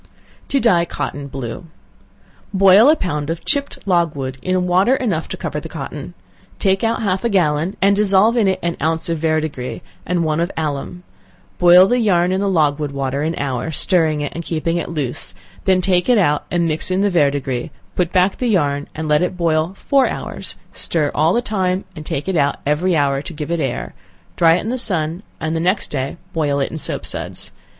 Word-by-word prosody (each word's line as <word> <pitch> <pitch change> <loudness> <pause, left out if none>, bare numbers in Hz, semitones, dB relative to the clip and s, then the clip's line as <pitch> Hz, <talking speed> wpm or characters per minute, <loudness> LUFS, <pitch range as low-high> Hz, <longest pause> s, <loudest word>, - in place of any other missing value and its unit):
To 275 - +1
Dye 190 -9 +4
Cotton 145 -3 -5
Blue. 135 +5 -6 0.8
Boil 195 +5 +6
a 310 - +6
pound 150 - -3
of 165 0 -4
chipped 280 -7 -2
logwood 150 -8 0
in 185 0 0
water 185 +8 +3
enough 200 -12 -1
to - - -5
cover - - -4
the - - -9
cotton; - - -7 0.4
take 195 0 +1
out 225 0 0
half 190 -2 0
a 235 - +1
gallon, 170 -3 +1
and 200 +1 +5
dissolve 205 +2 +4
in 225 -5 +3
it 190 - +1
an 170 0 -1
ounce 160 +2 0
of 165 -1 -1
verdigris, 155 -3 -2 0.2
and 175 -2 0
one 155 0 0
of 170 +2 0
alum; 155 +3 -3 0.6
boil 180 +1 +8
the 245 +5 +1
yarn 180 -5 +2
in 190 +1 0
the 200 - +1
logwood 150 -4 +1
water 135 0 -2
an 160 +2 -1
hour, 135 +1 -2
stirring 160 -1 +2
it, 145 - -3
and 170 - -5
keeping 165 +1 -1
it 170 - -3
loose; 135 - -4 0.3
then 185 -1 +3
take 180 +2 +1
it 245 - +5
out, 150 -7 +2
and 170 -1 +1
mix 155 +2 -1
in 185 +1 +1
the 205 0 +2
verdigris; 140 -6 0 0.3
put 180 -1 0
back 185 +1 +2
the 250 - -1
yarn, 145 -8 +1
and 155 0 -4
let 150 +1 +3
it 180 0 -1
boil 165 +1 0
four 275 -2 +2
hours, - - -5 0.2
stir 150 -4 0
all 155 +2 +3
the 240 +5 +1
time, 190 -3 -1
and 155 -2 -9
take 140 - -3
it 190 - 0
out 145 -3 +2
every 165 +5 +1
hour 140 -2 +1
to 160 - -8
give 150 +1 -5
it 170 - 0
air, 135 -5 -3 0.4
dry 165 -1 +5
it 180 - -1
in 220 - -4
the 255 +1 -2
sun, 170 -5 -1 0.2
and 160 +1 -2
the - - 0
next 185 +4 +1
day 135 +2 -3 0.2
boil 145 -3 0
it 135 - -1
in - - -5
soap - - -2
suds. - - -4
170 Hz, 205 wpm, -19 LUFS, 150-190 Hz, 0.8 s, boil